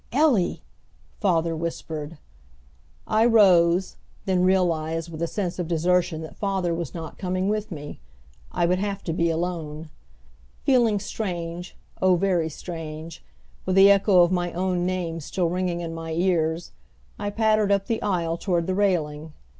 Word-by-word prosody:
"Ellie!" 260 Hz, -, +2 dB, 0.6 s
father 170 Hz, -5 st, +1 dB
whispered. 160 Hz, -1 st, -5 dB, 0.9 s
I 215 Hz, +1 st, +2 dB
rose, 190 Hz, -6 st, +4 dB, 0.3 s
then 185 Hz, -2 st, +2 dB
realized 165 Hz, -3 st, +1 dB
with 160 Hz, 0 st, -7 dB
a 170 Hz, -, +1 dB
sense 185 Hz, -1 st, -3 dB
of 175 Hz, -, -2 dB
desertion 175 Hz, 0 st, +1 dB
that 160 Hz, -, -9 dB
father 190 Hz, -4 st, -1 dB
was 165 Hz, -3 st, -4 dB
not 165 Hz, -2 st, -7 dB
coming 185 Hz, +1 st, -1 dB
with 215 Hz, 0 st, -1 dB
me. 145 Hz, -3 st, -7 dB, 0.5 s
I 175 Hz, -, +1 dB
would 180 Hz, +2 st, +1 dB
have 200 Hz, 0 st, -3 dB
to 165 Hz, -, -2 dB
be 170 Hz, +1 st, +1 dB
alone. 160 Hz, -2 st, -3 dB, 0.7 s
Feeling 235 Hz, -6 st, +3 dB
strange, 175 Hz, -4 st, -5 dB, 0.2 s
oh 185 Hz, -1 st, +5 dB
very 175 Hz, -3 st, +1 dB
strange, 160 Hz, 0 st, -8 dB, 0.4 s
with 185 Hz, -, +1 dB
the 195 Hz, +1 st, +8 dB
echo 195 Hz, -2 st, +5 dB
of 175 Hz, -, +2 dB
my 175 Hz, -1 st, 0 dB
own 180 Hz, 0 st, 0 dB
name 175 Hz, -3 st, -2 dB
still 170 Hz, +3 st, -1 dB
ringing 180 Hz, -1 st, -1 dB
in 165 Hz, -1 st, -5 dB
my 165 Hz, 0 st, -5 dB
ears, 170 Hz, -1 st, 0 dB, 0.5 s
I 205 Hz, 0 st, -2 dB
pattered 215 Hz, -1 st, +2 dB
up 200 Hz, -1 st, +2 dB
the 225 Hz, +1 st, -2 dB
aisle 170 Hz, -4 st, -1 dB
toward 170 Hz, -2 st, 0 dB
that 185 Hz, -, -1 dB
railing. 160 Hz, -6 st, 0 dB
175 Hz, 155 wpm, -24 LUFS, 165-195 Hz, 0.9 s, the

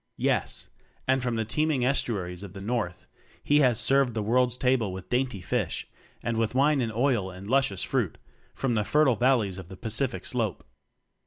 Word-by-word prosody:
Yes! -, -, 0 dB, 0.4 s
And 130 Hz, 0 st, +3 dB
from 120 Hz, -2 st, -1 dB
the 110 Hz, -1 st, -1 dB
teeming 150 Hz, +1 st, +1 dB
estuaries 95 Hz, -9 st, -1 dB
of 100 Hz, -2 st, -9 dB
the 95 Hz, -, -8 dB
North 105 Hz, -4 st, -3 dB, 0.4 s
he 145 Hz, +1 st, +4 dB
has 125 Hz, -5 st, +4 dB
served 135 Hz, -2 st, +3 dB
the 110 Hz, -, -1 dB
World's 125 Hz, +3 st, +2 dB
table 125 Hz, -6 st, +1 dB
with 95 Hz, 0 st, -9 dB
dainty 125 Hz, -5 st, 0 dB
fish, -, -, -2 dB, 0.4 s
and 115 Hz, -1 st, -1 dB
with 115 Hz, +1 st, 0 dB
wine 140 Hz, +1 st, +3 dB
and 115 Hz, -2 st, -1 dB
oil 115 Hz, -4 st, +1 dB
and 95 Hz, +2 st, -10 dB
luscious 130 Hz, -6 st, +1 dB
fruit -, -, -1 dB, 0.4 s
from 135 Hz, -3 st, 0 dB
the 105 Hz, -2 st, +1 dB
fertile 145 Hz, +2 st, +3 dB
valleys 115 Hz, -6 st, +2 dB
of 95 Hz, -, -9 dB
the 95 Hz, -, -10 dB
Pacific 115 Hz, +5 st, -2 dB
Slope. 110 Hz, -, -1 dB
120 Hz, 180 wpm, -27 LUFS, 100-130 Hz, 0.4 s, he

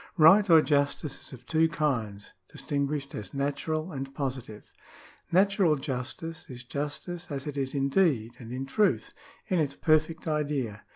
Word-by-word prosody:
Right 190 Hz, +6 st, +7 dB
or 160 Hz, -2 st, +8 dB
justice 140 Hz, -1 st, 0 dB
is -, -, -13 dB
of 125 Hz, -1 st, -11 dB
two 160 Hz, +4 st, +3 dB
kinds, 115 Hz, -11 st, -2 dB, 0.2 s
distinguished 140 Hz, -1 st, -2 dB
as 100 Hz, +1 st, -7 dB
natural 155 Hz, +4 st, -2 dB
and 135 Hz, -1 st, -5 dB
positive. 130 Hz, -6 st, -5 dB, 0.6 s
Natural 190 Hz, -2 st, +4 dB
justice 140 Hz, +4 st, -4 dB
is 120 Hz, -2 st, -8 dB
justice 150 Hz, +7 st, -5 dB
as 140 Hz, -2 st, -4 dB
it 150 Hz, -2 st, -5 dB
is 135 Hz, 0 st, -2 dB
in 140 Hz, 0 st, +1 dB
deed 135 Hz, -, +2 dB
and 115 Hz, -2 st, -9 dB
in 130 Hz, +2 st, -3 dB
truth 205 Hz, +10 st, +1 dB, 0.2 s
— -, -, -28 dB
in 180 Hz, -, +3 dB
its 140 Hz, -3 st, 0 dB
perfect 155 Hz, +1 st, +1 dB
idea. 145 Hz, -9 st, -2 dB
145 Hz, 160 wpm, -28 LUFS, 130-160 Hz, 0.6 s, or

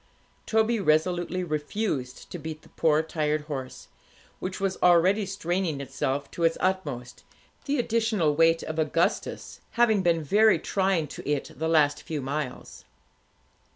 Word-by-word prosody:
Toby 220 Hz, +1 st, +2 dB
resolutely 175 Hz, +2 st, +1 dB
refused 150 Hz, -, -3 dB
to 175 Hz, -, -5 dB
beat 155 Hz, 0 st, -7 dB
the -, -, -18 dB
poor 155 Hz, -1 st, +2 dB
tired 155 Hz, -1 st, -1 dB
horse, 135 Hz, -4 st, -7 dB, 0.5 s
which 185 Hz, 0 st, -5 dB
was 195 Hz, -1 st, -1 dB
already 185 Hz, +4 st, +4 dB
straining 180 Hz, -5 st, -2 dB
itself 140 Hz, +1 st, -3 dB
to 170 Hz, -, -4 dB
its 165 Hz, 0 st, +3 dB
utmost, 145 Hz, -10 st, -2 dB, 0.4 s
the 285 Hz, 0 st, 0 dB
additional 220 Hz, -, +1 dB
weight 165 Hz, +1 st, +4 dB
of 155 Hz, 0 st, -4 dB
Augustus 160 Hz, +2 st, -1 dB, 0.2 s
having 220 Hz, -4 st, +4 dB
been 170 Hz, -3 st, +2 dB
very 210 Hz, +8 st, +4 dB
trying 190 Hz, -4 st, 0 dB
to 145 Hz, -, -8 dB
it 145 Hz, -2 st, -1 dB
the 160 Hz, +1 st, -2 dB
last 150 Hz, -3 st, +3 dB
few 160 Hz, -3 st, -4 dB
miles. 140 Hz, -1 st, -5 dB
165 Hz, 140 wpm, -26 LUFS, 150-190 Hz, 0.5 s, already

